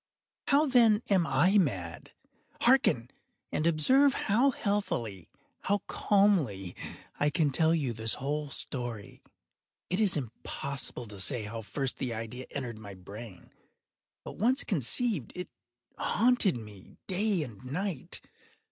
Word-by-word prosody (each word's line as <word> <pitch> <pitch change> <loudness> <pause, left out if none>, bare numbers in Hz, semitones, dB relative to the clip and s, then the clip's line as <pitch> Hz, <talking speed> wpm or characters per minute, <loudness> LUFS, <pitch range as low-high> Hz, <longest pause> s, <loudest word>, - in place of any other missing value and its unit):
How, 290 +2 +5
then, 235 -5 +5
am 180 -4 +4
I 175 +10 +4
mad? 95 - -2 0.5
Hearken! 235 - +4 0.4
and 155 - +1
observe 260 - +4
how 235 +7 +3
healthily—how 200 - -3
calmly 160 - +2 0.4
I 145 - +3
can 150 -1 +1
tell 160 +4 +3
you 140 -7 -1
the 110 0 -6
whole 145 +2 -2
story. 120 -6 -5 0.7
It 180 - +1
is 200 -7 +4
impossible 130 0 -4
to 105 -3 -10
say 120 +3 0
how 110 +2 -5
first 125 +5 -3
the 120 -3 -3
idea 115 +3 -6
entered 120 -5 -5
my 100 -2 -9
brain; 100 +1 -11 0.7
but - - -8
once 250 +6 +3
conceived, 175 - 0
it 180 - -5 0.5
haunted 235 - +3
me 105 -4 -12
day 195 -2 0
and 115 -7 -10
night. 160 +4 -3
145 Hz, 125 wpm, -30 LUFS, -, 0.7 s, How